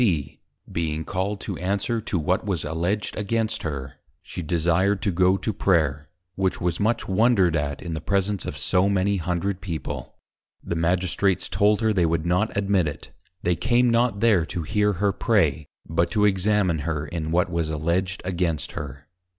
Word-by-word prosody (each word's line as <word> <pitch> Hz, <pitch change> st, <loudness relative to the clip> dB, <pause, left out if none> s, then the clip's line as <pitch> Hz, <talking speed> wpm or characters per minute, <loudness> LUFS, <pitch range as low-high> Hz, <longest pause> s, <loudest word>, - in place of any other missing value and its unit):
_ 80 Hz, -, 0 dB, 0.3 s
being 80 Hz, -1 st, -2 dB
called 100 Hz, +2 st, -2 dB
to 95 Hz, -3 st, -5 dB
answer 100 Hz, +5 st, -1 dB
to 105 Hz, -, -2 dB
what 90 Hz, +6 st, 0 dB
was 95 Hz, -8 st, -2 dB
alledged 85 Hz, +7 st, -2 dB
against 110 Hz, +1 st, -1 dB
her, 70 Hz, -4 st, -5 dB, 0.3 s
she -, -, -6 dB
desired 85 Hz, +4 st, +1 dB
to 100 Hz, -, 0 dB
go 90 Hz, +2 st, +3 dB
to 105 Hz, +3 st, -2 dB
Prayer, 75 Hz, -7 st, +1 dB, 0.3 s
which 95 Hz, 0 st, -1 dB
was 85 Hz, -1 st, -1 dB
much 115 Hz, +3 st, 0 dB
wondred 95 Hz, -4 st, +3 dB
at, 70 Hz, -2 st, -2 dB
in 85 Hz, -, -4 dB
the 80 Hz, -, -4 dB
presence 100 Hz, +2 st, 0 dB
of -, -, -5 dB
so 90 Hz, +2 st, +2 dB
many 100 Hz, 0 st, +1 dB
hundred 90 Hz, +2 st, -2 dB
People: 85 Hz, -6 st, -5 dB, 0.5 s
The 85 Hz, -, -3 dB
Magistrates 90 Hz, +2 st, +1 dB
told 105 Hz, +1 st, +2 dB
her, 110 Hz, -1 st, +2 dB
they 90 Hz, -4 st, +2 dB
would 80 Hz, 0 st, 0 dB
not 90 Hz, +5 st, +1 dB
admit 100 Hz, -4 st, +2 dB
it; 75 Hz, 0 st, -7 dB, 0.3 s
they 90 Hz, 0 st, +2 dB
came 120 Hz, +6 st, +2 dB
not 115 Hz, -3 st, +2 dB
there 110 Hz, -7 st, +4 dB
to 90 Hz, -4 st, -4 dB
hear 105 Hz, +4 st, +1 dB
her 100 Hz, +2 st, +1 dB
Pray, 85 Hz, -, +1 dB, 0.2 s
but 85 Hz, +1 st, +1 dB
to 105 Hz, +2 st, +2 dB
Examine 95 Hz, -3 st, +2 dB
her, 75 Hz, 0 st, -2 dB
in 80 Hz, +1 st, -4 dB
what 90 Hz, +2 st, +1 dB
was 85 Hz, -2 st, -1 dB
Alledged 85 Hz, +5 st, -1 dB
against 85 Hz, -4 st, -1 dB
her. 70 Hz, -1 st, -7 dB
90 Hz, 175 wpm, -24 LUFS, 80-100 Hz, 0.5 s, there